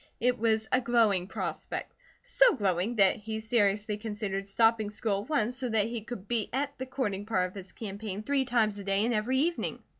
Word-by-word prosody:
It 250 0 +1
was 220 -1 +1
a 255 - +3
glowing 225 -7 +2
prospect; - - -4 0.3
so - - +4
glowing 195 0 0
that 195 -3 +4
he 220 +1 -5
seriously 210 -2 +1
considered 205 -2 -4
stopping 225 +1 +3
school 205 -1 -1
at 210 - -12
once 250 -5 0
so 260 -2 -2
that 220 0 +1
her 235 -2 -3
could 215 -4 -8
be 230 -2 -1
at 280 +2 -2
the 260 - -4
courting 210 -7 -3
part 185 -5 +1
of - - -18
his 190 -1 -8
campaign 205 -1 -6
three 275 +1 +1
times 220 -4 +1
a - - -6
day 195 +2 +1
and 240 - +1
every 230 +4 +1
evening. 330 +5 0
220 Hz, 205 wpm, -29 LUFS, 200-240 Hz, 0.3 s, so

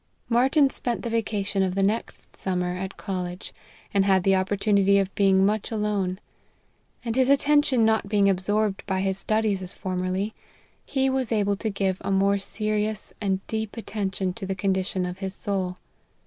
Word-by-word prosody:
Martyn 265 +5 +4
spent 240 -2 -2
the 235 - -3
vacation 205 -3 -1
of 185 -1 0
the 195 - +1
next 210 +4 -2
summer 180 -1 -2
at 190 +1 -5
college, 180 -2 -5 0.4
and 200 -1 +4
had 190 -2 +3
the 195 0 +4
opportunity 200 +1 +2
of 195 -1 0
being 195 -1 +4
much 210 +1 0
alone; 205 -4 -1 0.9
and 230 -1 -2
his 260 0 +3
attention 280 -3 +4
not 220 -2 +1
being 200 -1 +3
absorbed 200 +2 0
by 190 -1 0
his 195 0 -1
studies 215 -2 +1
as 180 -1 -7
formerly, 185 +3 -2 0.5
he 270 -1 0
was 260 -3 0
able 205 -2 +2
to 220 +2 -3
give 195 -2 -1
a 200 - -4
more 195 +1 +3
se 215 +2 -2
rious 215 0 0
and 195 -1 -1
deep 220 0 -4
attention 195 -4 -2
to 195 -1 -7
the 195 - -2
condition 190 -1 0
of 180 +1 -6
his 190 -1 -5
soul. 185 -3 -2
200 Hz, 175 wpm, -25 LUFS, 190-220 Hz, 0.9 s, Martyn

